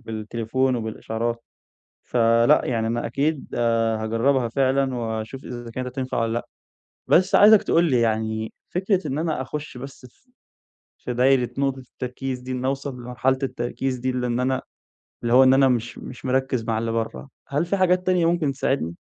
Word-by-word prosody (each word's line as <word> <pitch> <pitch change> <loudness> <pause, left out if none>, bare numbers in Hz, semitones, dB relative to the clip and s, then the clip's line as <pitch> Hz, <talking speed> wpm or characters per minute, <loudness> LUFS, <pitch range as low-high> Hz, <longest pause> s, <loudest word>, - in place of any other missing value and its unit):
بالتليفون 115 +3 -1
وبالإشعارات، 115 +1 -3 0.6
فلأ، 115 0 +4
يعني 115 -2 0
أنا 120 +1 -1
أكيد، 140 +5 -1
آآ، 115 -2 +1
هاجرّبها 120 +3 +1
فعلًا 135 +1 +1
وأشوف 115 +2 -4
إذا 120 -1 -7
كانت 125 +1 -4
هتنفع 130 0 -4
والَّا 115 0 0
لأ، 120 - -3 0.6
بس 185 +3 +4
عايزك 210 0 +7
تقُول 165 - +3
لي 125 - +3
يعني 110 -1 -1 0.2
فكرة 185 -2 0
إن 140 +1 -2
أنا 160 -5 -1
أخُشّ 145 0 -6
بس 135 0 -10
في 255 - -34 0.7
في 125 - -5
دايرة 125 -1 +3
نقطة 135 -1 0
التركيز 125 0 -6
دي، 130 +1 -6
إني 130 0 -2
أوصل 135 0 -2
لمرحلة 125 +2 0
التركيز 130 0 -2
دي، 130 +1 -1
لإن 125 -1 -1
أنا 130 +1 0 0.6
اللي 120 0 +1
هو 130 +1 +8
إن 130 - +6
أنا 135 0 +5
مش 120 -2 -1
مش 130 - -10
مركِّز 130 -2 0
مع 115 0 -1
اللي 115 +1 -1
برّه، 110 - -3 0.2
هل 145 +4 0
فيه 200 +3 -1
حاجات 185 -1 +2
تانية 180 -2 +2
ممكن 165 -4 +1
تساعدني؟ 130 - -1
125 Hz, 170 wpm, -23 LUFS, 115-135 Hz, 0.7 s, هو